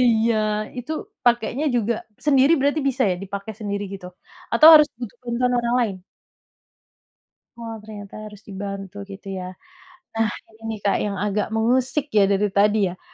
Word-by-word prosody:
iya 230 Hz, 0 st, +3 dB, 0.4 s
itu 295 Hz, +6 st, -5 dB, 0.3 s
pakainya 240 Hz, +4 st, +1 dB
juga 235 Hz, +1 st, +1 dB, 0.3 s
sendiri 275 Hz, +1 st, +5 dB
berarti 285 Hz, +3 st, +1 dB
bisa 265 Hz, 0 st, 0 dB
ya 180 Hz, -, +1 dB
dipakai 200 Hz, +2 st, -6 dB
sendiri 205 Hz, -1 st, -3 dB
gitu? 190 Hz, -2 st, -9 dB, 0.5 s
Atau 310 Hz, -, +8 dB
harus 300 Hz, -1 st, +7 dB
butuh 240 Hz, -2 st, -7 dB
bantuan 245 Hz, +1 st, 0 dB
orang 235 Hz, 0 st, 0 dB
lain? 215 Hz, -5 st, -1 dB, 1.6 s
Oh 230 Hz, -1 st, -6 dB
ternyata 205 Hz, -2 st, -10 dB, 0.2 s
harus 210 Hz, 0 st, -16 dB
dibantu 200 Hz, 0 st, -6 dB
gitu 195 Hz, 0 st, -11 dB
ya, 185 Hz, -1 st, -5 dB, 0.6 s
nah 225 Hz, 0 st, +1 dB, 0.3 s
ini 225 Hz, -2 st, -6 dB
Kak 200 Hz, -, +2 dB
yang 205 Hz, -1 st, -2 dB
agak 210 Hz, +2 st, -1 dB
mengusik 255 Hz, +5 st, +1 dB
ya 205 Hz, -4 st, +4 dB
dari 200 Hz, 0 st, +1 dB
tadi 205 Hz, -1 st, +3 dB
ya, 180 Hz, -, -12 dB
220 Hz, 150 wpm, -22 LUFS, 200-240 Hz, 1.6 s, Atau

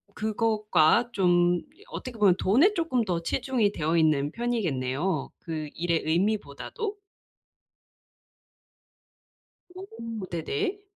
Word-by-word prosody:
그것과 215 Hz, -1 st, +2 dB
좀 175 Hz, -3 st, +3 dB, 0.3 s
어떻게 245 Hz, -3 st, -7 dB
보면 195 Hz, -4 st, +5 dB
돈에 280 Hz, -, +4 dB
쪼끔 325 Hz, -, 0 dB
더 175 Hz, -5 st, -2 dB
치중이 215 Hz, +2 st, 0 dB
되어있는 155 Hz, -2 st, +1 dB
편이겠네요 170 Hz, -, -1 dB
그 155 Hz, -3 st, -5 dB
일의 170 Hz, -1 st, 0 dB
의미보다도. 210 Hz, -, -1 dB, 2.7 s
오. 230 Hz, -, -7 dB
네네. 400 Hz, -, -2 dB
200 Hz, 205 characters per minute, -27 LUFS, 165-240 Hz, 2.7 s, 보면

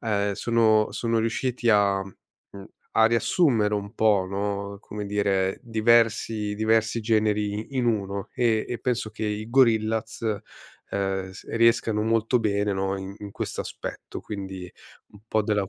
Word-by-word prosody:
uhm, 100 Hz, -3 st, 0 dB
sono 110 Hz, -1 st, +2 dB
sono 115 Hz, -1 st, 0 dB
riusciti 120 Hz, +2 st, -1 dB
a 100 Hz, -3 st, +4 dB
mhmm, 100 Hz, 0 st, -15 dB, 0.3 s
a 110 Hz, -, +4 dB
riassumere 115 Hz, -, +2 dB
un 100 Hz, 0 st, -4 dB
po', 105 Hz, -4 st, +3 dB
no, 100 Hz, 0 st, -3 dB
come 105 Hz, 0 st, -7 dB
dire, 100 Hz, -2 st, 0 dB
diversi 115 Hz, -2 st, +2 dB
diversi 110 Hz, +1 st, +1 dB
generi 105 Hz, -2 st, +1 dB, 0.2 s
i 135 Hz, -, -6 dB
in 125 Hz, -, +1 dB
1, 100 Hz, -3 st, -1 dB
e 115 Hz, -3 st, +2 dB
e 120 Hz, -, -4 dB
penso 115 Hz, -2 st, -2 dB
che 110 Hz, +1 st, -5 dB
i 105 Hz, +2 st, -4 dB
Gorillaz, 110 Hz, -3 st, +2 dB
uhm, 100 Hz, -3 st, -4 dB
s 95 Hz, -, -12 dB
riescano 115 Hz, -2 st, +3 dB
molto 115 Hz, +2 st, +2 dB
bene, 105 Hz, -2 st, 0 dB
no, 95 Hz, 0 st, -1 dB
in 95 Hz, 0 st, -7 dB
in 105 Hz, -1 st, -8 dB
quest'aspetto, -, -, -6 dB
quindi, 95 Hz, -3 st, -7 dB, 0.4 s
un 105 Hz, -, -17 dB
po' 110 Hz, -1 st, +2 dB
della 105 Hz, -1 st, +1 dB
cu -, -, -11 dB
105 Hz, 150 wpm, -25 LUFS, 100-115 Hz, 0.4 s, a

